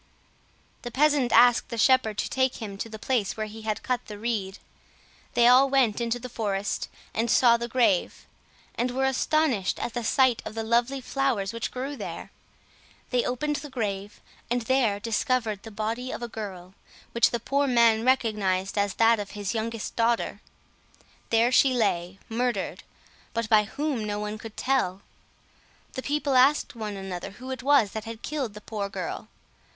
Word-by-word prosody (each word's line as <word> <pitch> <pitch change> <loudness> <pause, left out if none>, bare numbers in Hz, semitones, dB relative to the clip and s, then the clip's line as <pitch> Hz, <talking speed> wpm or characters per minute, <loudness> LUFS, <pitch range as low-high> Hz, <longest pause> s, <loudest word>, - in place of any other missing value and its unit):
The 240 - -5
peasant 285 0 +2
asked 245 +1 +5
the 235 - -5
shepherd 225 -3 +3
to - - -1
take 260 -1 +1
him 210 -4 -6
to 225 - -4
the 220 - -7
place 225 -3 -1
where 215 - -2
he 215 +1 -9
had 215 -1 -3
cut 250 -1 -2
the 210 - -7
reed. 205 -4 -2 0.8
They 240 0 +5
all 260 +3 +6
went 255 -5 +2
into 235 0 0
the 245 +1 -7
forest, 205 -4 -2 0.4
saw 235 0 +5
the 235 0 -3
grave, 230 -6 +1 0.5
and 245 - -1
were 265 +2 0
astonished 265 -5 +1
at 235 - -4
the 240 - -3
sight 255 +1 +3
of - - -7
the 225 - -2
lovely 240 +4 +1
flowers 250 -7 -1
which 230 - -3
grew 270 +3 -5
there. - - -7 0.8
They 250 -1 +2
opened 295 +4 -1
the 295 0 -8
grave, 205 -5 -4 0.3
and 245 0 0
there 230 -5 +2
discovered 225 -1 -1
the 225 - -9
body 225 +4 -3
of - - -5
a - - -2
girl, 190 -5 -8 0.4
which 235 -1 +4
the 235 - -2
poor 280 +4 0
man 230 -3 +4
recognized 210 -7 +1
as 200 -1 0
that 230 0 +4
of 205 -1 -5
his 205 0 -2
youngest 225 -1 -4
daughter. 230 0 0 0.9
There 230 +2 +3
she 260 0 +4
lay, 185 -5 0
murdered—but 230 0 -4
by 215 -1 +5
whom 280 0 -2
no 205 -1 -2
one 210 +1 -4
could 225 -1 -10
tell. 200 -8 0 0.9
The 260 - -4
people 285 -1 -1
asked 270 +4 +4
one 210 -3 -5
another 190 -1 -6
who 255 +1 -7
it 260 - -5
was 270 -6 +4
that 220 -1 -5
had 225 0 -8
killed 270 -8 -3
the 210 - -9
poor 205 -2 -4
girl. - - -5
230 Hz, 175 wpm, -26 LUFS, 210-255 Hz, 0.9 s, all